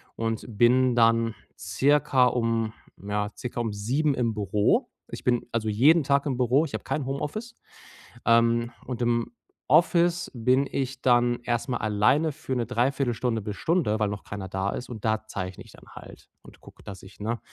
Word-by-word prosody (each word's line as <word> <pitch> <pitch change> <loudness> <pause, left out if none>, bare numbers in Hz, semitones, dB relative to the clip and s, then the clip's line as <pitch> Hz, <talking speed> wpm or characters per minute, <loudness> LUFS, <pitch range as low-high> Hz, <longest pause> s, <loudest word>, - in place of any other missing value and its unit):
und 115 -1 -3
bin 120 +3 +3
dann 115 -1 +3 0.2
circa 130 +6 +2
um, 115 -2 0 0.3
ja 105 +1 -2
circa 120 -1 -5
um 115 -3 -2
7:00 135 +9 0
im 115 -2 0
Büro. 105 -1 +1 0.2
Ich - - -7
bin 120 -1 +1
also 110 -2 -1
jeden 145 +10 +4
Tag 140 0 +1
im 130 -4 -1
Büro. 130 +5 +3
Ich 140 - -9
habe - - -4
kein 135 +1 -2
Homeoffice. 150 - -4 0.7
Ähm, 115 0 +3
und 125 -1 -5
im 120 -1 0 0.4
Office 170 +3 +3
bin 130 +3 +2
ich 135 -1 -3
dann 120 -1 +3
erstmal 120 +1 -2
alleine 110 +9 +2
für 135 -2 -5
'ne 120 -2 -1
dreiviertel 125 +1 0
Stunde 115 -1 -1
bis 105 0 -5
Stunde, 145 - 0
weil 105 - +2
noch 100 0 -6
keiner 100 -2 -6
da 95 +1 -2
ist 125 - -6
und 115 -3 -8
da 110 0 0
zeichne 95 -3 -6
ich - - -17
dann - - -17
halt - - -13
und - - -17
gucke, - - -17
dass 95 -2 -10
ich, 95 +2 -15
ne, 115 +2 -2
120 Hz, 180 wpm, -26 LUFS, 110-135 Hz, 0.7 s, jeden